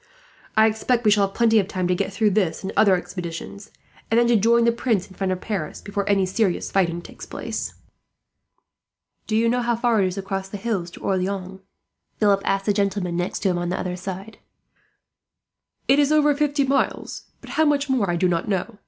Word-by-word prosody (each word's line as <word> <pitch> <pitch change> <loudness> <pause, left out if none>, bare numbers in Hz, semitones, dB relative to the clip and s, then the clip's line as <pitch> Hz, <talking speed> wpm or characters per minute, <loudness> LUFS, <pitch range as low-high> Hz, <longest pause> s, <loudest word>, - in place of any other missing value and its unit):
I 220 - +7
expect 225 +2 +1
we 210 - +6
shall 205 -1 +4
have 195 - -16
plenty 225 -2 +4
of 195 - 0
time 185 -3 -2
to 180 - +2
get 180 - -1
through 210 +1 +2
this 190 -4 0
and 190 - -4
other 200 -3 +5
expeditions, 180 +2 -6 0.4
and 225 - +4
then 240 - +4
to 240 - +4
join 230 +2 +4
the 235 - +5
Prince 230 -5 0
in 190 - -15
front 190 0 -2
of 185 0 -3
Paris 195 -8 -4
before 200 0 -3
any 195 -2 +3
serious 190 -1 -1
fighting 175 -3 +1
takes - - -11
place." - - -5 1.5
"Do 215 - -1
you 230 +1 +3
know 245 +2 +1
how 240 0 +1
far 230 -2 +2
it 190 - +2
is 185 +1 -5
across 195 0 -4
the 205 - -6
hills 195 -5 -2
to - - -11
Orleans?" 190 0 -2 0.6
Philip 200 -2 +3
asked 195 0 0
the 205 - +2
gentlemen 195 -3 -1
next 175 +1 -2
to 195 - +2
him 175 -1 0
on 175 0 -2
the 185 - -2
other 180 -1 -3
side. 190 +3 -7 1.5
"It 275 +2 +5
is 290 0 +3
over 300 -1 +4
fifty 290 0 +1
miles, 275 +1 -1
but - - -11
how 315 - +2
much 290 -1 +2
more 250 -8 +1
I 175 - +1
do 180 +2 +2
not 175 +3 -1
know. 205 +2 -2
200 Hz, 215 wpm, -23 LUFS, 185-230 Hz, 1.5 s, I